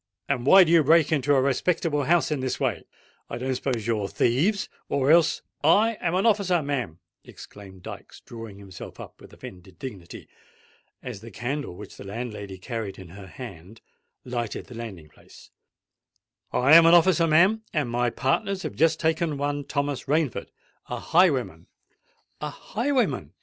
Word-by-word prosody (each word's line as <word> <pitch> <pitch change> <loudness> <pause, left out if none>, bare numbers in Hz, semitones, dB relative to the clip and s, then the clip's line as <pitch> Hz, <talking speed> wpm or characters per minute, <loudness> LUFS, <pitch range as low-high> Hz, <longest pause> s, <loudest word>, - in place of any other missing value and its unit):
and 130 -2 -1
why 190 +4 +9
do 165 - 0
you 165 -2 +6
break 160 +2 +4
into 145 -1 +2
a - - +4
respectable 145 +1 0
house 170 +1 +2
in 150 - 0
this 130 -1 -3
way? 120 - -1 0.5
I - - -4
don't 130 +2 -2
suppose 125 -4 -2
you're 110 -4 -1
thieves—or 140 - 0
else——" 165 -1 +4 0.2
"I 215 +9 +4
am 175 0 0
an 190 - +1
officer, 195 -7 +2
ma'am," 125 - -3 0.3
exclaimed 95 -3 -13
Dykes, - - -10
drawing 115 -4 -10
himself 95 -2 -11
up - - -11
with - - -14
offended 90 -1 -12
dignity, 95 -7 -9 0.8
as 120 -6 -7
the 115 - -10
candle 120 0 -4
which - - -11
the - - -9
landlady 100 -2 -6
carried 105 -1 -5
in 95 -3 -11
her 95 +2 -11
hand 100 -2 -10 0.5
lighted 120 -3 -4
the 125 - -12
landing 105 -9 -8
place:—"I 130 - -5
am 165 0 +9
an 170 - +7
officer, 170 -1 +4
ma'am—and 170 - +2
my 120 0 +1
partners 185 +11 -1
have - - -4
just 165 0 +2
taken 160 -2 0
one 145 0 -2
Thomas 140 -2 -2
Rainford, 150 -3 0 0.4
a - - -4
highwayman——" 140 - +1 0.7
"A 150 - -3
highwayman!" 210 - -2
135 Hz, 155 wpm, -25 LUFS, 110-165 Hz, 0.8 s, why